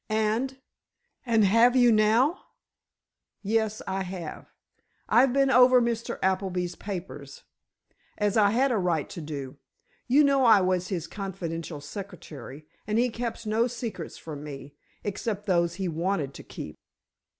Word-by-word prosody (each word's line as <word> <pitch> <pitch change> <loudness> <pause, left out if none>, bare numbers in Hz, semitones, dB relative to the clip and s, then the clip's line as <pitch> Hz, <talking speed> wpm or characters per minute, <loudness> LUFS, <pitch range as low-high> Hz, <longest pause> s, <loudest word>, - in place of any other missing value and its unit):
"And—and 225 0 -2
have 230 +5 +5
you 245 -2 +6
now?" 225 - +3 1.0
"Yes, 215 +1 0
I 195 0 -2
have. 180 -4 -6 0.6
I've 255 +2 +5
been 275 +1 +3
over 250 0 +7
Mr. 235 0 -2
Appleby's 185 -2 0
papers—as 200 +2 -7
I 210 -2 +5
had 255 +5 +2
a 225 - +1
right 170 -5 0
to 170 - -7
do. 140 -3 -6 0.5
You 275 +4 +5
know 275 -2 +3
I 225 -4 +7
was 185 -1 0
his 175 -4 -3
confidential 170 -6 -5
secretary, 155 -4 -9 0.2
and 215 0 0
he 245 +2 +3
kept 235 0 -5
no 220 +3 +2
secrets 230 -8 -6
from 150 -3 -8
me—except 195 +8 -6
those 170 -3 +1
he 190 0 -3
wanted 165 -3 -1
to - - -10
keep!" - - -9
205 Hz, 130 wpm, -27 LUFS, 175-235 Hz, 1.0 s, over